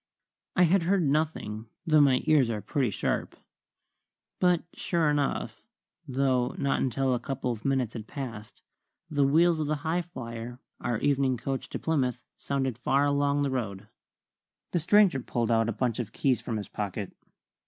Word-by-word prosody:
I 180 - +5
had 180 +2 +4
heard 185 +2 +2
nothing, 140 -8 -1 0.2
though 155 -2 +5
my 135 -3 +4
ears 145 -6 +4
are 110 -2 -2
pretty 120 +5 0
sharp. 100 - -2 1.0
But 180 -2 +3
sure 165 -4 +1
enough, 145 -2 -1 0.5
though 130 -2 +1
not 140 -1 0
until 130 +1 +1
a 125 - 0
couple 130 -1 -3
of 110 -2 -6
minutes 130 -4 0
had 110 -2 -7
passed, 120 -7 -7 0.5
the 145 -1 +2
wheels 165 +3 +4
of 155 - -1
the 150 -1 -1
Highflyer, 125 -9 -4 0.2
our 120 -2 -1
evening 135 -3 +2
coach 135 +3 -4
to - - -4
Plymouth, 125 -7 -1
sounded 135 -4 -2
far 135 +3 +2
along 145 0 +2
the 140 - 0
road. 105 -5 -4 0.8
The 175 - +1
stranger 185 -2 +4
pulled 120 -1 -1
out 115 0 +3
a - - +1
bunch 120 +1 -1
of 110 -4 -3
keys 130 -3 +1
from 115 - -3
his 105 - -5
pocket. 100 -1 -5
135 Hz, 165 wpm, -28 LUFS, 120-150 Hz, 1.0 s, I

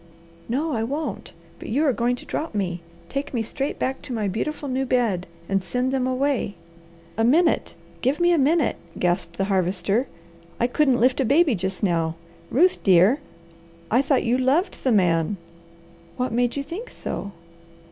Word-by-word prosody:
"No, 295 +6 0
I 225 - 0
won't! 285 +7 -3 0.3
But - - -8
you 280 +8 +2
are 275 - +3
going 240 +1 +1
to - - -12
drop 310 -7 -4
me. 180 -4 -2 0.3
Take 275 0 -4
me 230 - +1
straight 275 +5 -3
back 265 +1 -2
to 255 - -6
my 215 -3 -1
beautiful 285 +9 -3
new 260 0 0
bed, 235 -9 0 0.2
and 195 0 +1
send 250 +5 -1
them 260 -1 0
away." 260 -5 0 0.6
"A 225 - +2
minute! 320 +8 +3 0.3
Give 265 +4 +1
me 345 0 +4
a 345 - +4
minute!" 305 +4 +2 0.2
gasped 175 0 -1
the 195 - +1
Harvester. 195 +5 +1 0.5
"I - - +3
couldn't 260 0 +2
lift 255 +3 +3
a - - +3
baby 290 +3 +4
just 190 0 -3
now. 165 -4 +1 0.3
Ruth, 355 +8 +3
dear, 190 - +5 0.7
I 240 +4 +5
thought 275 -1 +2
you 245 +2 +1
LOVED 290 +9 +1
the 260 - +2
man." 180 -2 +2 0.8
"What 250 -1 -1
made 245 +1 +1
you 280 - -2
think 365 - -7
so?" 200 - -5
250 Hz, 175 wpm, -24 LUFS, 200-280 Hz, 0.8 s, dear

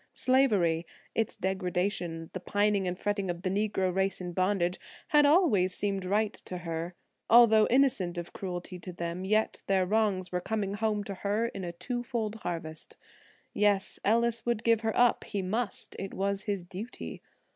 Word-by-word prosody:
Slavery–its 215 -5 +1
degradation, 180 -3 -2
the 185 - -3
pining 205 +1 +1
and 180 0 -2
fretting 200 -1 -1
of 175 0 -4
the 185 - 0
Negro 195 -2 0
race 195 +1 0
in 175 -1 -5
bondage–had 190 - +1
always 245 - +4
seemed 195 -2 -1
right 210 +3 +1
to 180 - -7
her. 165 0 -4 0.3
Although 225 -2 +7
innocent 245 -10 +2
of 175 0 -6
cruelty 180 -1 -5
to 180 - -7
them, 170 +2 -4
yet 215 +2 +1
their 190 -1 +3
wrongs 200 -2 +1
were 180 0 -1
coming 205 -1 -2
home 210 0 0
to 200 - -4
her 205 +4 -1
in 195 - -7
a 175 - -3
two 240 +9 -4
fold 230 -4 -3
harvest. 165 -5 -5 0.6
Yes, 205 -1 +2
Ellis 230 +1 +2
would 235 -2 -1
give 230 -1 +3
her 220 -1 -1
up; 245 0 +4
he 200 -2 -3
must; 215 +3 -2
it 195 - -5
was 200 +1 -1
his 200 -4 -2
duty. 190 +7 -7
195 Hz, 165 wpm, -29 LUFS, 180-220 Hz, 0.6 s, Although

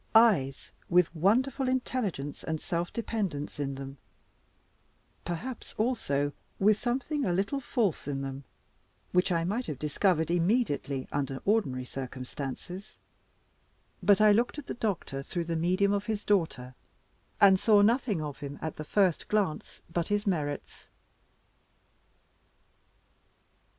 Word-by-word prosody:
Eyes 180 - +4 0.2
with 180 -1 +3
wonderful 250 - +2
intelligence 215 - -2
and 160 -1 -2
self 170 +2 -2
dependence 195 -12 -3
in 140 -1 -2
them; 135 0 -8 1.3
perhaps, 220 +9 -5
also, 145 - 0 0.2
with 210 +2 +4
something 270 +4 -1
a 185 - +1
little 200 +10 0
false 230 - -1
in 140 -1 -2
them, 135 0 -5 0.7
which 180 +1 +3
I 165 -1 +2
might 215 +8 -1
have 150 - -4
discovered 160 +3 +1
immediately 170 - +1
under 135 -1 -2
ordinary 175 - +1
circumstances: 135 +9 -6 1.0
but 195 +1 +5
I 215 0 +7
looked 235 +7 +2
at 295 - -6
the - - -4
doctor 195 - -2
through 170 +4 -3
the 165 0 -2
medium 185 +5 +2
of 200 0 -1
his 215 -2 -2
daughter, 160 -11 0 0.7
and 190 -2 +7
saw 210 -1 +5
nothing 220 - +2
of 145 -2 -6
him 145 0 -6
at 160 - -5
the 155 - -4
first 185 +1 +2
glance 205 -7 -1
but 170 0 -2
his 205 +1 0
merits. 150 -7 -3
180 Hz, 130 wpm, -29 LUFS, 145-215 Hz, 1.3 s, I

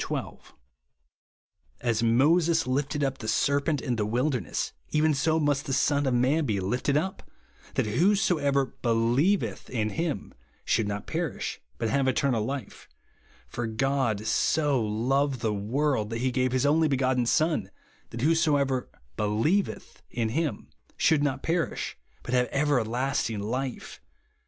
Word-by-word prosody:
12). - - -5 1.3
"As 115 -2 0
Moses 160 +7 +3
lifted 145 +3 -1
up 135 -1 -1
the 110 - -6
serpent 140 +5 +1
in 120 -2 -2
the 105 - 0
wilderness, 125 - -1 0.2
even 155 0 +2
so 160 +3 +1
must 145 -2 0
the 135 - -1
Son 140 +1 +2
of 130 - +2
man 135 +6 +2
be 105 -3 0
lifted 125 +9 0
up, 190 +5 -2 0.5
that - - +1
whosoever 145 - +2
believeth 120 - +1
in 110 -4 -1
him 165 - -3 0.3
should 110 - +1
not 100 0 -4
perish - - -3 0.2
but 115 -2 -1
have 140 -1 +2
eternal 130 -3 +1
life; 135 +4 -6 0.6
for 120 -1 -4
God 120 -2 0
so 145 -1 +2
loved 130 +5 0
the 110 -2 0
w^orld, 110 +2 0
that 115 - -3
he 130 0 +1
gave 130 0 +1
his 130 +1 +1
only 155 +2 +4
begotten 130 -3 +1
Son, 155 +5 +1 0.4
that 115 - -6
whosoever 145 -4 +2 0.3
believeth 115 - -1
in 115 -2 -1
him 150 +5 -2 0.3
should 155 -3 +3
not 140 -2 -1
perish, 165 0 -1 0.3
but 120 - -5
have 125 -1 +3
everlasting 130 -4 0
life. 125 +5 -4
135 Hz, 140 wpm, -27 LUFS, 115-150 Hz, 1.3 s, only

